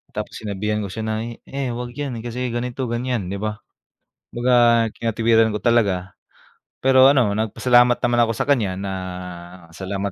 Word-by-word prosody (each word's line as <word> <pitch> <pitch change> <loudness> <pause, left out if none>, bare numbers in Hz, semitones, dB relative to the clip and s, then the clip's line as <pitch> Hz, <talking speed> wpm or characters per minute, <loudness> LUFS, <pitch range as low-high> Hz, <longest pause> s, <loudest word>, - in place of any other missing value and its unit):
Tapos - - -5
sinabihan 105 0 -2
ko - - -4
siya 110 +4 -6
na, 110 0 -2 0.3
"Eh, 135 -2 -3
huwag 120 0 -5
yan 140 -4 -4
kasi 125 +1 -3
ganito, 125 +2 -3
ganyan", 120 -4 -2
'di 100 - -4
ba? 105 0 -4 0.7
Baga 120 -1 +3
kinatwiran 115 0 +2
ko - - -1
talaga, 100 -7 +1 0.7
pero 130 0 +6
ano, 120 -7 +2
nagpasalamat 120 +3 +3
naman 120 0 +1
ako 115 - 0
sa - - -2
kanya 105 -10 +1
na, 100 -1 -4 0.8
"Salamat 100 +1 -4
115 Hz, 155 wpm, -21 LUFS, 105-125 Hz, 0.8 s, pero